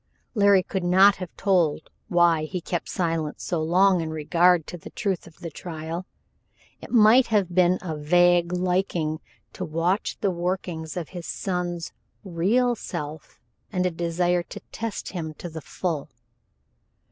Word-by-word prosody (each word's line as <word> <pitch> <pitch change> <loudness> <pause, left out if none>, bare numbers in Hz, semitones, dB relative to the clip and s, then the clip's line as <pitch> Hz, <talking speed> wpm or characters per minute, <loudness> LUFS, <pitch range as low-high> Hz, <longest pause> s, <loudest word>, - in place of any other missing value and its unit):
Larry 200 -4 +5
could 190 0 -3
not 190 +3 +6
have 185 -2 -6
told 175 -7 +1 0.2
why 170 -3 +3
he 180 +4 -4
kept 175 0 -4
silent 165 -4 -2
so 170 -3 -2
long 180 +3 +4
in 160 - -3
regard 165 +2 +3
to - - -7
the - - -10
truth 195 -5 -3
of 160 - -18
the 165 - -6
trial. 165 +2 -6 0.7
It - - -10
might 235 +2 +6
have 200 -5 +1
been 180 0 +4
a 160 -4 -3
vague 175 +3 +3
liking 180 -3 0 0.3
to - - -5
watch 170 +6 -1
the 200 - +1
workings 175 -2 -3
of 170 -4 -4
his 175 -3 -8
son's 175 -3 -3 0.3
real 205 +8 +1
self 155 -8 -7 0.3
and 185 -3 0
a 180 - +1
desire 175 +1 0
to - - -9
test 225 -1 -4
him 160 -4 -5
to 175 - -7
the 160 -1 -7
full. 160 -2 -3
175 Hz, 155 wpm, -25 LUFS, 165-185 Hz, 0.7 s, not